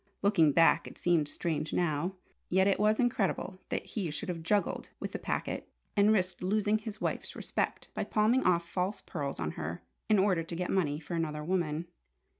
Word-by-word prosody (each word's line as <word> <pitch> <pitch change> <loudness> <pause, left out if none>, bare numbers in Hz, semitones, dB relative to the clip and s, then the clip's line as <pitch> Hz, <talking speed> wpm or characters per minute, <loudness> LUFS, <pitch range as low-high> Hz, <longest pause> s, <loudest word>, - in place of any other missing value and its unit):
Looking 195 -7 +5
back, 165 +3 +4
it - - -11
seemed 170 -4 +2
strange 155 0 -2
now. 170 +2 0 0.3
Yet 190 +1 +4
it 195 -1 +3
was 215 +1 +3
incredible 200 -5 0
that - - -2
he 195 -7 -3
should 185 +7 -4
have 170 -2 -3
juggled 200 +5 0
with - - -4
the - - -4
packet, - - -3 0.3
and 205 +1 +5
risked 185 -4 +1
losing 210 +3 +2
his 215 -1 -6
wife's - - -3
respect - - -2
by - - -2
palming 225 +5 +3
off 170 -1 +2
false 185 +3 -2
pearls 145 - -4
on 80 -2 -1
her, 85 +3 -5 0.3
in 215 - +5
order 190 -3 +3
to 165 +1 -6
get 180 +1 -2
money 150 -6 +1
for 165 +2 -8
another 155 -2 -2
woman. 165 -2 0
180 Hz, 190 wpm, -31 LUFS, 160-205 Hz, 0.3 s, Looking